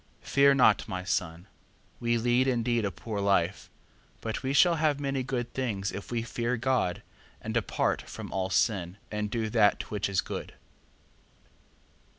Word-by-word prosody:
4:23. -, -, -16 dB
Fear 140 Hz, 0 st, +6 dB
not, 110 Hz, -6 st, +4 dB
my 90 Hz, -1 st, -4 dB
son: 90 Hz, -1 st, -2 dB, 0.5 s
we 120 Hz, 0 st, +1 dB
lead 120 Hz, +3 st, +2 dB
indeed 120 Hz, -3 st, +1 dB
a -, -, +1 dB
poor 105 Hz, +4 st, -5 dB
life, 100 Hz, -2 st, +1 dB, 0.5 s
but 110 Hz, -1 st, -4 dB
we 130 Hz, -1 st, -2 dB
shall 170 Hz, +4 st, +5 dB
have 150 Hz, -2 st, +1 dB
many 135 Hz, -2 st, -1 dB
good 125 Hz, -2 st, -3 dB
things 105 Hz, -7 st, -2 dB
if 100 Hz, +1 st, -7 dB
we 115 Hz, -1 st, -1 dB
fear 120 Hz, +1 st, -2 dB
God, 125 Hz, -7 st, 0 dB, 0.4 s
and -, -, -5 dB
depart -, -, 0 dB
from -, -, -7 dB
all 95 Hz, -1 st, -1 dB
sin, 95 Hz, -2 st, 0 dB
and 105 Hz, 0 st, -2 dB
do 110 Hz, 0 st, -1 dB
that 105 Hz, -3 st, +2 dB
which 105 Hz, -2 st, -1 dB
is 95 Hz, -1 st, +1 dB
good. -, -, -6 dB
115 Hz, 160 wpm, -29 LUFS, 100-130 Hz, 0.5 s, Fear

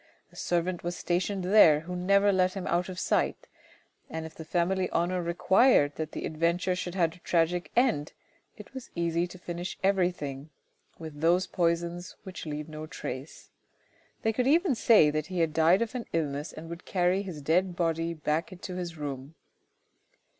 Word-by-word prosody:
A -, -, -20 dB
servant 175 Hz, +1 st, -1 dB
was 175 Hz, +1 st, -3 dB
stationed 185 Hz, +2 st, -1 dB
there, 180 Hz, -6 st, +6 dB
who 180 Hz, +3 st, -6 dB
never 200 Hz, +3 st, +3 dB
let 185 Hz, 0 st, +2 dB
him 195 Hz, -, -4 dB
out 175 Hz, +2 st, 0 dB
of 185 Hz, -, -7 dB
sight, -, -, 0 dB, 0.6 s
and 160 Hz, 0 st, -5 dB
if 160 Hz, -, -9 dB
the 160 Hz, -, -9 dB
family 180 Hz, +3 st, 0 dB
honour 180 Hz, +1 st, 0 dB
required 170 Hz, -, +3 dB
that 155 Hz, -1 st, -4 dB
the -, -, -4 dB
adventure 170 Hz, +3 st, 0 dB
should 180 Hz, 0 st, -5 dB
have 165 Hz, -3 st, +2 dB
a 180 Hz, -, -17 dB
tragic 175 Hz, +1 st, 0 dB
end, 235 Hz, -, +2 dB, 0.4 s
it -, -, -12 dB
was 260 Hz, -2 st, -8 dB
easy 170 Hz, 0 st, 0 dB
to 185 Hz, -, -11 dB
finish 175 Hz, 0 st, -6 dB
everything 175 Hz, -7 st, 0 dB, 0.5 s
with 155 Hz, -3 st, -9 dB
those 175 Hz, +3 st, +3 dB
poisons 170 Hz, +1 st, -1 dB
which 185 Hz, -4 st, -8 dB
leave 150 Hz, 0 st, -4 dB
no 155 Hz, 0 st, -7 dB
trace. 130 Hz, 0 st, -7 dB, 0.7 s
They 220 Hz, -, +2 dB
could 250 Hz, +3 st, 0 dB
then 330 Hz, +2 st, +4 dB
say 220 Hz, -9 st, +5 dB
that 155 Hz, 0 st, -2 dB
he 185 Hz, -2 st, -2 dB
had 160 Hz, -2 st, +1 dB
died 165 Hz, +6 st, +4 dB
of 230 Hz, -, -6 dB
an 250 Hz, -2 st, -5 dB
illness 150 Hz, -3 st, -2 dB
and 160 Hz, +1 st, -9 dB
would 170 Hz, +1 st, -8 dB
carry 180 Hz, +1 st, +1 dB
his 185 Hz, -6 st, -7 dB
dead 175 Hz, +4 st, +1 dB
body 165 Hz, -1 st, -1 dB
back 155 Hz, +2 st, -1 dB
into 185 Hz, 0 st, -7 dB
his 170 Hz, -2 st, -5 dB
room. 140 Hz, 0 st, -6 dB
175 Hz, 175 wpm, -28 LUFS, 160-185 Hz, 0.7 s, there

